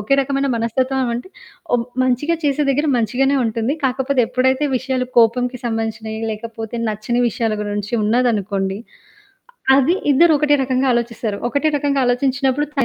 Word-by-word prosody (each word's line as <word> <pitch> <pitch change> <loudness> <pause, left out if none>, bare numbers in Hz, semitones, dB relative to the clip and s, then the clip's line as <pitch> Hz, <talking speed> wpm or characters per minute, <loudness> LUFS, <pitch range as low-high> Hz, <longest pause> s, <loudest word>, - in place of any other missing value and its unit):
ఒకే 215 +7 +1
రకమైన 275 +1 -1
మనస్తత్వం 255 +3 0
అంటే 245 +10 -6 0.4
ఓ 245 - +5 0.3
మంచిగా 255 +7 +1
చేసే 290 +1 +1
దగ్గర 290 +3 +1
మంచిగానే 255 +5 +1
ఉంటుంది. 230 +5 -1
కాకపోతే 265 +1 +1
ఎప్పుడైతే 260 +3 +1
విషయాలు 255 0 -2
కోపంకి 245 +2 +2
సంబంధించినవి 225 -1 -3
లేకపోతే, 225 +1 -7
నచ్చని 215 +3 -1
విషయాల 225 0 -1
గురించి 205 +2 -4
ఉన్నదనుకోండి, 210 -4 0 1.0
అది 280 +6 +3 0.2
ఇద్దరు 330 +4 +5
ఒకటే 295 0 +3
రకంగా 260 +1 0
ఆలోచిస్తారు. 230 -3 -2
ఒకటే 285 +5 +1
రకంగా 280 -1 0
ఆలోచించినప్పుడు 270 +3 +1
తను 275 -4 +1
250 Hz, 135 wpm, -19 LUFS, 225-275 Hz, 1.0 s, ఓ